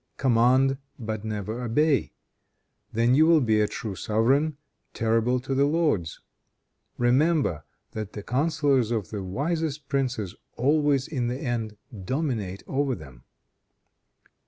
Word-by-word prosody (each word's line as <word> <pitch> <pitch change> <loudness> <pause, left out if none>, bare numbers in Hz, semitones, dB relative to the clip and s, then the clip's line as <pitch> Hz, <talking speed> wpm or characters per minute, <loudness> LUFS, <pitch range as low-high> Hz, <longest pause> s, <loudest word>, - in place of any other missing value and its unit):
Command, 130 +2 +3 0.2
but 110 -3 -4
never 110 +2 -4
obey. 140 +5 +2 0.8
Then 115 +2 +2
you 155 +4 +5
will 165 -1 +6
be 110 -5 +2
a 105 - +2
true 105 -1 -5
sovereign, 135 +10 +1 0.4
terrible 115 +3 +1
to 135 +1 -3
the 140 +1 +3
lords. 145 - 0 0.8
Remember 125 - +2 0.3
that 110 -2 -6
the 105 - -6
counselors 140 -2 +1
of 110 -5 -2
the 105 -2 -4
wisest 150 - -2
princes 130 -9 -1 0.2
always 145 +1 +2
in 125 -6 -2
the 125 +1 -2
end 115 -6 -3 0.3
dominate 110 - -2
over 135 -1 0
them." 65 -7 -13
125 Hz, 125 wpm, -26 LUFS, 110-140 Hz, 0.8 s, will